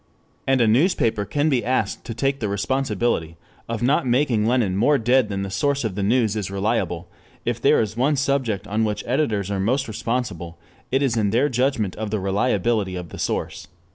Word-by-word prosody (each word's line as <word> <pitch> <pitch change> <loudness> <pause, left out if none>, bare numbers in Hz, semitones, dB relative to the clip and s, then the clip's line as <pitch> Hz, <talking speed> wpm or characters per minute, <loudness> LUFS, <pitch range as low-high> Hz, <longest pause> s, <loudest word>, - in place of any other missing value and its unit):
And 135 -1 +3
a 115 - +4
newspaper 115 - +2
can 145 +10 0
be 130 -6 +1
asked 120 -5 -1
to 115 - -5
take 135 +3 0
the 105 - -2
responsibility 100 -5 -1 0.3
of 115 0 -3
not 135 +1 +2
making 120 -4 +2
Lenin 115 -6 +1
more 140 +9 +3
dead 125 -1 +2
than 100 -1 -2
the 95 - -5
source 140 +4 0
of 110 -4 -2
the 100 - -3
news 110 +1 +2
is 105 -4 -3
reliable; 100 -3 -1 0.4
if - - -2
there - - +4
is 110 -1 -1
one 135 +5 +2
subject 130 -7 0
on 110 +2 0
which 105 -1 -2
editors 110 -7 0
are 100 - -1
most 130 +8 0
responsible 105 -7 -3 0.3
it 135 +2 +1
is 120 -4 +1
in 105 -2 +2
their 125 +8 +2
judgment 125 -6 0
of 110 0 -3
the 110 0 -1
reliability 100 0 0
of 90 -2 -6
the - - -9
source. 90 - -3
115 Hz, 200 wpm, -22 LUFS, 100-130 Hz, 0.4 s, a